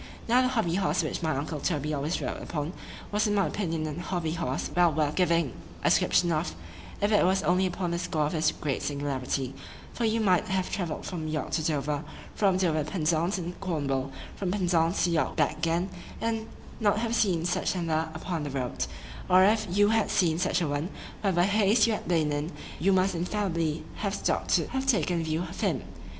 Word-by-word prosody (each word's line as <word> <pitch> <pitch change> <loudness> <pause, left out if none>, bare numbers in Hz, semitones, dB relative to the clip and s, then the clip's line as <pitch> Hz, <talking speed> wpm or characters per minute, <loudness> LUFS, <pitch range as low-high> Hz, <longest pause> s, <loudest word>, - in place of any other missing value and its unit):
Now 245 +2 +5
the 255 - +3
HOBBY 220 -9 +1
HORSE 170 -1 +1
which 155 - -3
my 160 -4 0
uncle 150 +2 -3
Toby 150 -1 -1
always 150 +4 -1
rode - - -4
upon, 150 +1 -3 0.4
was 210 +1 +2
in 205 - +1
my 195 - +3
opinion 165 -6 -2
an 155 +1 -4
HOBBY 175 -3 -2
HORSE 165 -6 -2
well 175 -1 +5
worth 150 -1 0
giving 170 -6 +2 0.3
a - - +4
description 175 -1 +3
of, 155 - -1 0.4
if 205 +1 +1
it 210 - +5
was 190 +2 +2
only 180 +4 +3
upon 175 -1 -2
the 170 - -1
score 155 -3 0
of 150 - -2
his 160 -1 +2
great 140 -3 -3
singularity;—for 140 - -4
you 225 0 +2
might 185 -5 +3
have 190 -1 -1
travelled 175 -6 -3
from 165 -4 -4
York 155 -1 -3
to 160 - 0
Dover,—from 155 +6 -1
Dover 160 -5 +1
to 150 - -7
Penzance 170 +2 +1
in 175 -1 -4
Cornwall, 145 -8 -1
and - - -13
from 190 - -1
Penzance 175 -2 +2
to 175 - +2
York 160 -5 +1
back 155 -1 +1
again, 165 +3 +1 0.3
and 225 -1 -1 0.3
not 210 -2 +3
have 230 +1 -1
seen 180 -8 +2
such 180 - 0
another 160 -2 0
upon 165 0 -3
the 145 - -3
road; 130 -3 -2 0.4
or 185 +1 +7
if 215 +2 +3
you 205 +3 +4
had 225 -1 +2
seen 165 -3 +2
such 180 0 +1
a 165 - +1
one, 145 +4 -2 0.3
whatever 185 -4 +2
haste 210 +3 +4
you 230 - +2
had - - -4
been 160 -4 +2
in, 145 +3 -2 0.3
you 195 +5 +3
must 190 0 +3
infallibly 170 -3 -1
have 200 -1 -1
stopp'd - - -1
to - - +3
have 265 0 -2
taken 180 - +2
a - - -2
view 160 +2 -1
of - - -8
him. - - 0
170 Hz, 205 wpm, -28 LUFS, 155-195 Hz, 0.4 s, or